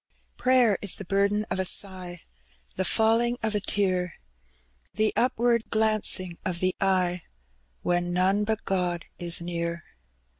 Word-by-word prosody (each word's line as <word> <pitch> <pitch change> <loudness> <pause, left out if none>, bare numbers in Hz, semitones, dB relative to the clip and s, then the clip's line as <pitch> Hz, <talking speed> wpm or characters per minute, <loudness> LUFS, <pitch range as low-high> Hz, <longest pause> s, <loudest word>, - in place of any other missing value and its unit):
Prayer 250 -6 +3
is 200 - +1
the 195 - -8
burden 200 +3 +1
of - - -1
a - - +2
sigh, 185 -2 -2 0.5
The 190 - 0
falling 230 +4 +3
of 220 -1 0
a 210 - +1
tear, 185 -3 0 0.8
The 215 +1 +2
upward 240 -2 +1
glancing 215 -5 +1
of 175 -2 -3
the 185 0 0
eye 185 -2 +1 0.6
When 175 0 0
none 190 +3 +2
but 220 +1 -2
God 180 -3 -1
is 175 0 +1
near. 170 -1 -3
190 Hz, 140 wpm, -26 LUFS, 175-215 Hz, 0.8 s, Prayer